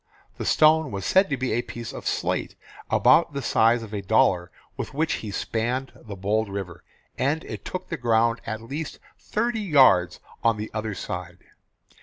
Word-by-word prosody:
The -, -, -3 dB
stone 155 Hz, -1 st, +4 dB
was 100 Hz, -4 st, -5 dB
said 190 Hz, +1 st, +4 dB
to 140 Hz, -, -1 dB
be 130 Hz, 0 st, -2 dB
a 120 Hz, -, +1 dB
piece 120 Hz, -1 st, -8 dB
of -, -, -7 dB
slate -, -, -1 dB, 0.3 s
about 135 Hz, +5 st, +4 dB
the 140 Hz, -, -3 dB
size 115 Hz, +1 st, +3 dB
of 110 Hz, -1 st, -10 dB
a 100 Hz, -, -2 dB
dollar 95 Hz, -3 st, +2 dB, 0.3 s
with -, -, -6 dB
which 160 Hz, +2 st, +1 dB
he 110 Hz, -, -6 dB
spanned 120 Hz, +6 st, -2 dB
the 105 Hz, -4 st, -10 dB
bold 105 Hz, +3 st, 0 dB
river, 90 Hz, -3 st, -6 dB, 0.4 s
and 150 Hz, +5 st, 0 dB
it -, -, -7 dB
took 185 Hz, 0 st, -6 dB
the 165 Hz, -, -3 dB
ground 115 Hz, -2 st, +2 dB
at 110 Hz, 0 st, -4 dB
least 145 Hz, +6 st, -5 dB, 0.2 s
thirty 230 Hz, +1 st, -1 dB
yards 135 Hz, -, +4 dB, 0.2 s
on 115 Hz, -2 st, +3 dB
the 105 Hz, +1 st, -5 dB
other 110 Hz, -2 st, -3 dB
side. -, -, -6 dB
115 Hz, 180 wpm, -25 LUFS, 105-145 Hz, 0.4 s, stone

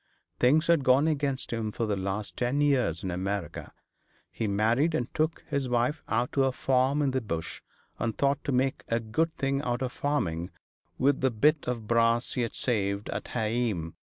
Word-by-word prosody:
Things 150 Hz, +6 st, +4 dB
had 170 Hz, -4 st, +3 dB
gone 130 Hz, +4 st, +4 dB
against 140 Hz, -5 st, -1 dB
him 110 Hz, -2 st, -2 dB
for 115 Hz, -, -2 dB
the 105 Hz, -2 st, 0 dB
last 100 Hz, +2 st, -3 dB
ten 125 Hz, +3 st, 0 dB
years 125 Hz, -, +2 dB
in 95 Hz, -, -2 dB
America. 95 Hz, -1 st, -4 dB, 0.6 s
He 110 Hz, -, -2 dB
married 115 Hz, +11 st, +2 dB
and 120 Hz, -5 st, -2 dB
took 155 Hz, +1 st, -1 dB
his 140 Hz, -4 st, -1 dB
wife 125 Hz, +5 st, +1 dB
out 115 Hz, +3 st, 0 dB
to 135 Hz, -1 st, +2 dB
a 135 Hz, -, +2 dB
farm 135 Hz, +3 st, +1 dB
in 135 Hz, -, +1 dB
the 130 Hz, 0 st, 0 dB
Bush, 85 Hz, -7 st, -4 dB, 0.4 s
and 115 Hz, -2 st, -2 dB
thought 140 Hz, 0 st, +1 dB
to -, -, 0 dB
make 130 Hz, +1 st, +1 dB
a 115 Hz, -, +1 dB
good 140 Hz, +9 st, -1 dB
thing 135 Hz, 0 st, 0 dB
out 125 Hz, -1 st, -1 dB
of 125 Hz, -, -2 dB
farming 90 Hz, -, -1 dB, 0.5 s
with 135 Hz, +1 st, +2 dB
the 130 Hz, -, +3 dB
bit 145 Hz, +6 st, +2 dB
of 120 Hz, -3 st, -2 dB
brass 115 Hz, +1 st, +2 dB
he'd 120 Hz, -3 st, -2 dB
saved 100 Hz, -4 st, -1 dB
at -, -, -4 dB
heeam. 110 Hz, -7 st, -1 dB
125 Hz, 185 wpm, -28 LUFS, 110-140 Hz, 0.6 s, Things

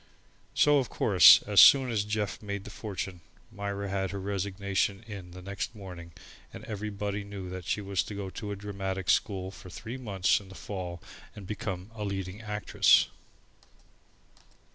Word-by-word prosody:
So, 145 Hz, -1 st, +5 dB
of 130 Hz, -, -2 dB
course, 95 Hz, -4 st, +7 dB
as 105 Hz, -1 st, +6 dB
soon 135 Hz, -3 st, +8 dB
as 105 Hz, -3 st, +1 dB
Jeff 105 Hz, -1 st, -2 dB
made 100 Hz, -2 st, -5 dB
the -, -, -10 dB
fortune, 95 Hz, -4 st, -5 dB, 0.3 s
Myra 100 Hz, 0 st, -4 dB
had 95 Hz, -1 st, -1 dB
her 100 Hz, -, -5 dB
resignation 100 Hz, +1 st, -1 dB
in 100 Hz, -5 st, -9 dB
next 100 Hz, +4 st, -4 dB
morning 90 Hz, -4 st, -9 dB, 0.4 s
and -, -, -10 dB
everybody 105 Hz, -1 st, -4 dB
knew 100 Hz, -2 st, -7 dB
that 90 Hz, -1 st, -6 dB
she 105 Hz, -, -1 dB
was 100 Hz, -3 st, 0 dB
to 105 Hz, -, -7 dB
go 100 Hz, -2 st, -5 dB
to 105 Hz, +1 st, -6 dB
a -, -, -3 dB
dramatic 95 Hz, -2 st, -2 dB
school 95 Hz, -2 st, 0 dB
for 95 Hz, -1 st, -12 dB
three 115 Hz, +7 st, -7 dB
months 100 Hz, -7 st, +1 dB
in 100 Hz, -2 st, -14 dB
the 95 Hz, -, -12 dB
fall 90 Hz, -4 st, -6 dB, 0.3 s
and 100 Hz, -, -9 dB
become 95 Hz, -1 st, -5 dB
a 105 Hz, -2 st, -6 dB
leading 95 Hz, 0 st, -4 dB
actress. 105 Hz, -, +3 dB
100 Hz, 165 wpm, -29 LUFS, 95-105 Hz, 0.4 s, soon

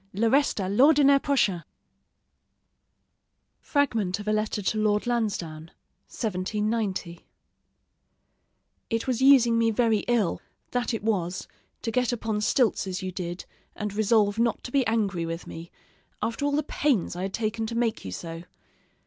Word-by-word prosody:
le 220 Hz, +4 st, +1 dB
reste 280 Hz, -4 st, +2 dB
à 190 Hz, -, -1 dB
l'ordinaire 280 Hz, +6 st, +5 dB
prochain. 205 Hz, -, +1 dB, 2.0 s
FRAGMENT 225 Hz, -10 st, 0 dB
OF 205 Hz, -, -8 dB
A 215 Hz, -, +2 dB
LETTER 215 Hz, -1 st, -1 dB
TO 215 Hz, +3 st, 0 dB
LORD 210 Hz, -1 st, +1 dB
LANSDOWNE 185 Hz, -10 st, -2 dB, 0.4 s
(1790) 210 Hz, -3 st, -2 dB, 1.7 s
It 225 Hz, -1 st, -1 dB
was 255 Hz, -1 st, -1 dB
using 250 Hz, -4 st, +6 dB
me 230 Hz, 0 st, +3 dB
very 225 Hz, -1 st, +2 dB
ill, 235 Hz, -7 st, +1 dB, 0.3 s
that 245 Hz, 0 st, -1 dB
it 220 Hz, -, -6 dB
was, 185 Hz, -5 st, -1 dB, 0.4 s
to 230 Hz, -, -2 dB
get 250 Hz, +1 st, +1 dB
upon 220 Hz, -3 st, -2 dB
stilts 220 Hz, -2 st, +2 dB
as 185 Hz, +1 st, -4 dB
you 185 Hz, -, -3 dB
did, 175 Hz, -1 st, -5 dB, 0.3 s
and 210 Hz, -1 st, -4 dB
resolve 215 Hz, 0 st, +2 dB
not 235 Hz, -1 st, +1 dB
to 245 Hz, -, -7 dB
be 275 Hz, 0 st, +3 dB
angry 200 Hz, -7 st, 0 dB
with 165 Hz, +1 st, -5 dB
me, 165 Hz, +1 st, -9 dB, 0.5 s
after 230 Hz, +5 st, -2 dB
all 285 Hz, -, 0 dB
the 300 Hz, +1 st, +1 dB
pains 275 Hz, -, 0 dB
I 180 Hz, -, -5 dB
had 190 Hz, +1 st, -3 dB
taken 220 Hz, 0 st, -2 dB
to 230 Hz, -, -5 dB
make 235 Hz, -1 st, 0 dB
you 95 Hz, -, -6 dB
so. 165 Hz, -, -6 dB
215 Hz, 150 wpm, -26 LUFS, 190-240 Hz, 2.0 s, using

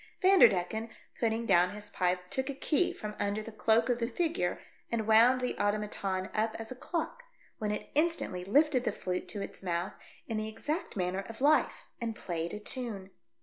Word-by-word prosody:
Vanderdecken, 225 Hz, -, +4 dB, 0.3 s
putting 230 Hz, 0 st, 0 dB
down 180 Hz, -2 st, +4 dB
his 210 Hz, 0 st, -8 dB
pipe, 180 Hz, 0 st, -1 dB
took 265 Hz, +1 st, -1 dB
a 280 Hz, -, -3 dB
key 310 Hz, +5 st, +2 dB
from 210 Hz, 0 st, -6 dB
under 205 Hz, +1 st, -1 dB
the 225 Hz, -, -8 dB
cloak 220 Hz, +1 st, +3 dB
of 245 Hz, -1 st, +1 dB
the 230 Hz, -, 0 dB
figure 310 Hz, -, -1 dB, 0.3 s
and 225 Hz, -2 st, 0 dB
wound 230 Hz, +4 st, +6 dB
the 250 Hz, -, -1 dB
automaton 205 Hz, -2 st, -1 dB
up 220 Hz, +1 st, 0 dB
as 225 Hz, +1 st, -7 dB
a -, -, -5 dB
clock, 340 Hz, -, -3 dB, 0.4 s
when 215 Hz, -2 st, -1 dB
it 210 Hz, -, -4 dB
instantly 305 Hz, -, +1 dB
lifted 265 Hz, -, +3 dB
the -, -, +1 dB
flute 180 Hz, -1 st, -3 dB
to 205 Hz, -2 st, -4 dB
its -, -, -8 dB
mouth, 175 Hz, 0 st, -2 dB, 0.3 s
in 225 Hz, -, -2 dB
the 215 Hz, 0 st, -2 dB
exact 295 Hz, +10 st, -3 dB
manner 185 Hz, +1 st, -1 dB
of 225 Hz, -, -8 dB
life, 295 Hz, +3 st, +3 dB, 0.2 s
and 230 Hz, -1 st, -2 dB
played 170 Hz, -4 st, -3 dB
a 210 Hz, -, -5 dB
tune. 210 Hz, -4 st, -4 dB
220 Hz, 190 wpm, -31 LUFS, 195-250 Hz, 0.4 s, wound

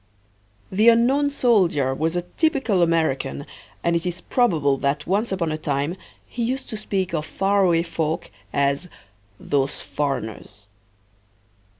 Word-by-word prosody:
The 215 Hz, +5 st, +5 dB
unknown 260 Hz, +5 st, +4 dB
soldier 185 Hz, -, +2 dB
was 160 Hz, +5 st, -1 dB
a 175 Hz, -, 0 dB
typical 270 Hz, -, +1 dB
American 160 Hz, -, 0 dB, 0.4 s
and 170 Hz, 0 st, +2 dB
it 165 Hz, -, 0 dB
is 180 Hz, 0 st, -3 dB
probable 160 Hz, -, +2 dB
that 140 Hz, +2 st, -1 dB
once 205 Hz, +5 st, 0 dB
upon 170 Hz, -4 st, -1 dB
a 155 Hz, -, -3 dB
time 145 Hz, +2 st, -1 dB, 0.3 s
he 240 Hz, -, -6 dB
used 255 Hz, +3 st, -2 dB
to -, -, -3 dB
speak 190 Hz, -4 st, -2 dB
of 155 Hz, -2 st, 0 dB
faraway 190 Hz, -1 st, +2 dB
folk 165 Hz, -2 st, -3 dB, 0.2 s
as 140 Hz, +5 st, 0 dB, 0.5 s
"those 140 Hz, -1 st, -1 dB
foreigners." 115 Hz, -7 st, -4 dB
170 Hz, 130 wpm, -23 LUFS, 145-205 Hz, 0.5 s, The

